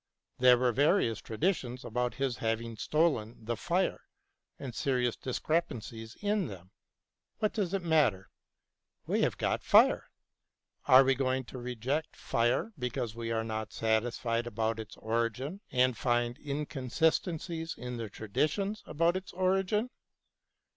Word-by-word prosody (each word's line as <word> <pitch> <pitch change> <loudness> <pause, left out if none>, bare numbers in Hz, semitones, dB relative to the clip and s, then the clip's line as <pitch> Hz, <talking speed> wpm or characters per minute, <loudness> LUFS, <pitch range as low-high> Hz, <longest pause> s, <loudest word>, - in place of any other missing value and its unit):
There 125 0 +7
were 125 0 +2
various 135 - +2
tradi 155 - +1
tions 125 -2 -7
about 125 +1 -1
his 135 -3 -1
having 115 0 -2
stolen 115 - 0
the 120 +1 -1
fire, 175 - 0 0.6
and 130 -3 -6
serious 125 -2 0
discrepancies 120 -6 -3
in 205 -4 +1
them. 95 -3 -10 0.7
What 215 -2 0
does 200 -6 -1
it 190 - -2
matter? 145 - +2 0.7
We - - +1
have - - +1
got - - 0
fire. - - +5 0.8
Are 130 +1 +9
we 135 0 +3
going 130 0 0
to 130 +1 -9
reject 125 +5 -3
fire 120 - 0
because 125 -2 -2
we 115 0 -4
are 115 0 0
not 110 -1 -4
satisfied 115 +1 0
about 115 0 -1
its 110 -1 -8
origin 115 - -2
and 125 -1 +3
find 120 0 +1
inconsistencies 160 +4 -1
in 125 0 -5
the 115 -2 -5
traditions 155 - -1
about 170 +3 +2
its 185 0 -5
origin 195 +5 +1
125 Hz, 135 wpm, -31 LUFS, 115-160 Hz, 0.8 s, Are